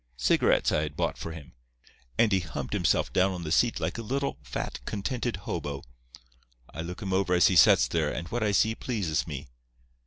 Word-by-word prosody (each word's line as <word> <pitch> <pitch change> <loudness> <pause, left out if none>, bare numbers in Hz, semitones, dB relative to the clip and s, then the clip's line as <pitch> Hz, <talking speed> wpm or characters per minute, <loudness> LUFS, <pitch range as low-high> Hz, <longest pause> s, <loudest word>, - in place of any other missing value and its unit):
Cigarettes - - +3
I 75 - +2
had 75 -1 -4
bought - - 0
for 85 - -6
him, 80 -3 -10 0.6
and 115 -2 +4
he 95 - +3
humped 85 -3 -5
himself - - +1
down 95 +1 +3
on 90 -1 -6
the 75 - -4
seat 120 +7 +3
like - - -3
a - - -3
little, 135 - -2
fat, 60 -4 -5
contented 120 +3 -2
hobo. 70 -4 -4 0.9
I - - -5
look 90 +5 -6
him 95 -1 -2
over 95 -1 +2
as 90 - +5
he 95 - +1
sets 75 - +6
there, - - 0
and 85 - -5
what 120 - -2
I 105 -1 +2
see 110 +2 +3
pleases 90 - -2
me. - - -6
90 Hz, 205 wpm, -28 LUFS, 80-110 Hz, 0.9 s, sets